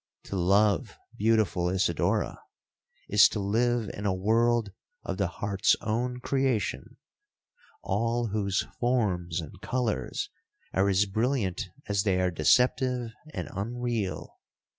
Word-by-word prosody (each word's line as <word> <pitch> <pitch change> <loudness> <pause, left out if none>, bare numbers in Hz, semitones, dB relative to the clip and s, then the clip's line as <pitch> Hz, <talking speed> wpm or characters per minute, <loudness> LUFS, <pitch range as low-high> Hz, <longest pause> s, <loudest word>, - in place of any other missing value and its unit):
To - - -6
love, 100 +2 +2 0.2
beautiful 105 -5 +2
Isidora, 90 -3 0 0.7
is 105 0 +6
to 105 - -3
live 115 +3 +1
in 100 +1 -3
a 95 - +2
world 115 +2 +2 0.3
of 95 - -4
the 100 -1 +1
heart's 100 +2 +1
own 125 +3 -2
creation—all 130 - -3
whose 100 -2 0 0.2
forms 95 -9 0
and 80 -4 -9
colours 115 - -2 0.4
are 95 +2 +3
as 100 +1 +3
brilliant 110 -1 -1 0.2
as 100 -1 +1
they 95 -2 +1
are 90 0 +1
deceptive 125 - +2 0.2
and - - -5
unreal. 115 0 -3
105 Hz, 115 wpm, -28 LUFS, 95-120 Hz, 0.7 s, is